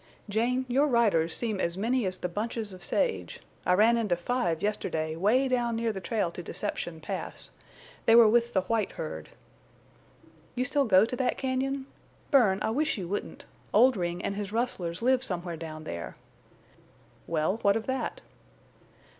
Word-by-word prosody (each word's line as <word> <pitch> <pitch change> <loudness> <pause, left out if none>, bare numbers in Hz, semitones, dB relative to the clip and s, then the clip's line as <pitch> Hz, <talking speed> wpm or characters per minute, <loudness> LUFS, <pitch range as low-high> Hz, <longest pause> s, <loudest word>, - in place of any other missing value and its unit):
"Jane, 240 +5 0
your 270 +4 +3
riders 205 - +2
seem 220 -5 -2
as 170 -1 -1
many 230 +2 +1
as 185 - -3
the - - -3
bunches 215 +2 -3
of 180 -1 -11
sage. 485 -2 -1 0.3
I 180 - +5
ran 220 +5 +5
into 210 -6 +1
five 175 -3 -1
yesterday 160 -6 -1
'way 220 +10 +3
down 240 -2 0
near 225 -1 -1
the 190 - -6
trail 205 -3 -1
to 175 - -7
Deception 175 -2 -4
Pass. - - -6 0.6
They 225 - +7
were 235 -1 +9
with 235 +2 +2
the 190 - +3
white 215 +2 -1
herd." - - -6 1.3
"You 250 - 0
still 280 +2 +2
go 195 -2 +6
to 245 - -3
that 260 - 0
cañon? 265 +1 -1 0.5
Bern, 230 -10 +5
I - - 0
wish 305 +3 0
you 185 -4 -4
wouldn't. 200 +3 -5 0.3
Oldring 180 -8 +3
and 200 - -2
his 205 -1 -4
rustlers 215 -6 -2
live 255 0 +3
somewhere 180 -7 -2
down 155 -1 -7
there." 85 - -6 1.1
"Well, 165 +5 0
what 200 -3 +2
of 225 - -5
that?" 265 - -3
215 Hz, 165 wpm, -28 LUFS, 180-245 Hz, 1.3 s, were